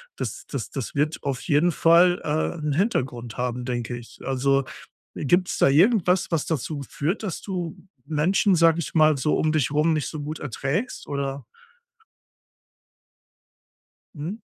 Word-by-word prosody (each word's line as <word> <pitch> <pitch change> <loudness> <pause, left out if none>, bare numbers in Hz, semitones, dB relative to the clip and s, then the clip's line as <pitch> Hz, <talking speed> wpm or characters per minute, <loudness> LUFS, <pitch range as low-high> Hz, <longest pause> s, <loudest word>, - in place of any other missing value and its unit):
das - - -5
das 135 -6 -5
das 135 -1 -5
wird 150 +3 0
auf 135 -2 -2
jeden 155 +4 +2
Fall, 170 +3 +5
äh, 155 +3 -1
'n 150 -2 -2
Hintergrund 130 - -1
haben, 125 0 -2
denke 120 -1 -3
ich. 120 -1 -11
Also, 135 +1 +2 0.5
äh, - - -4
gibt's 180 +5 +2
da - - +5
irgendwas, 185 - +3
was 160 -3 0
dazu 150 -1 -2
führt, 170 +10 -2
dass 190 -6 -4
du 180 -5 -4 0.3
Menschen, 180 +5 +2
sage 165 0 +4
ich 165 - -5
mal 155 -2 +5
so, 150 +4 +1
um 155 - +1
dich 155 -4 +1
rum 155 +2 +2
nicht 150 -2 -1
so 155 - -6
gut 150 +2 -5
erträgst, 150 - -3
oder? 140 -1 -3 2.7
Mhm. 170 +10 -5
155 Hz, 155 wpm, -24 LUFS, 135-170 Hz, 2.7 s, Fall